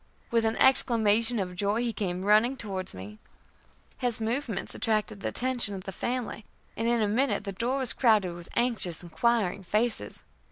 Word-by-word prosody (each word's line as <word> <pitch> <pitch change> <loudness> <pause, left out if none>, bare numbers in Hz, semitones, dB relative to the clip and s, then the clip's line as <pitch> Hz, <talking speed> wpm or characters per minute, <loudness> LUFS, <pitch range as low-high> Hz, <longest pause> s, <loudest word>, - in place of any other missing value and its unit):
With 230 -1 +2
an 220 0 +1
exclamation 230 -3 +3
of 180 -3 -3
joy, 205 +4 0
he 235 -2 -2
came 185 -3 -3
running 215 +6 +4
towards 190 - -4
me. 100 +3 -10 0.8
His 245 -3 -1
movements 225 -1 -2
attracted 215 -2 -1
the - - -4
attention 245 -5 +3
of 190 - -7
the 195 - -6
family, 240 +1 -4 0.3
and 225 - -2
in 235 -2 +2
a - - +1
minute 225 0 0
the 200 - -4
door 235 +7 -2
was 260 -3 +2
crowded 215 -8 +3
with 170 0 -11
anxious, 215 -9 +1
inquiring 205 +2 0
faces. 215 +5 -2
220 Hz, 170 wpm, -28 LUFS, 195-240 Hz, 0.8 s, running